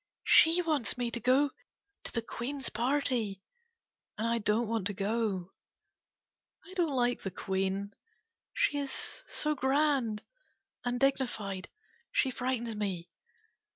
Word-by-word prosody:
She 335 +2 +7
wants 300 -8 +1
me 240 -1 -1
to 235 - -2
go 260 +4 +3 0.5
to - - -5
the 230 - -2
Queen 245 +5 -4
a - - -5
party 240 -6 0 0.7
and 220 - -1
I 230 0 +2
don't 215 +2 +1
want 220 -4 0
to 205 - -4
go. 200 -3 -1 1.1
I 370 - -12
don't 335 -7 +1
like 245 -1 +1
the 195 - -3
Queen, 195 +2 -2 0.6
she 290 - +1
is 285 - -5
so 305 0 0
grand 265 -5 +1 0.6
and 245 0 -1
dignified. 220 -8 0 0.4
She 265 - +2
frightens 245 -3 -2
me. 190 -5 -3
235 Hz, 130 wpm, -31 LUFS, 210-275 Hz, 1.1 s, She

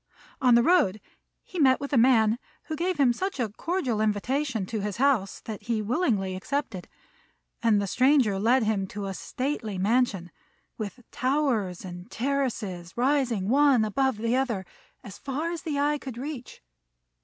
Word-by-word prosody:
On 250 -2 +6
the 235 - +5
road 235 - +3 0.4
he 370 - -7
met 260 -3 +5
with 280 0 -5
a - - +4
man 230 -2 +4 0.2
who 315 - -5
gave 355 +2 -1
him 255 -4 +5
such 380 +3 -3
a 235 -3 0
cordial 255 - -2
invitation 225 +2 0
to 220 +3 -4
his 205 -1 -3
house 250 -7 +1
that 215 -2 -7
he 230 -2 -1
willingly 215 - 0
accepted; 215 -2 -3 0.7
and 225 -3 +3
the 200 - -1
stranger 250 -2 +3
led 240 +4 +3
him 210 -3 0
to 205 +1 -6
a 195 - -3
stately 230 - -3
mansion, 195 -3 +1 0.4
with 215 +3 -6
towers 255 - 0
and 180 0 -9
terraces 230 -9 -3
rising 250 -6 +1
one 270 -2 +4
above 265 +2 0
the 230 +3 0
other 235 -8 -1 0.4
as 200 - -10
far 295 +5 -3
as 340 - -5
the 300 -3 -3
eye 295 +1 +1
could 260 -4 -8
reach. 265 -1 -7
240 Hz, 165 wpm, -27 LUFS, 205-275 Hz, 0.7 s, On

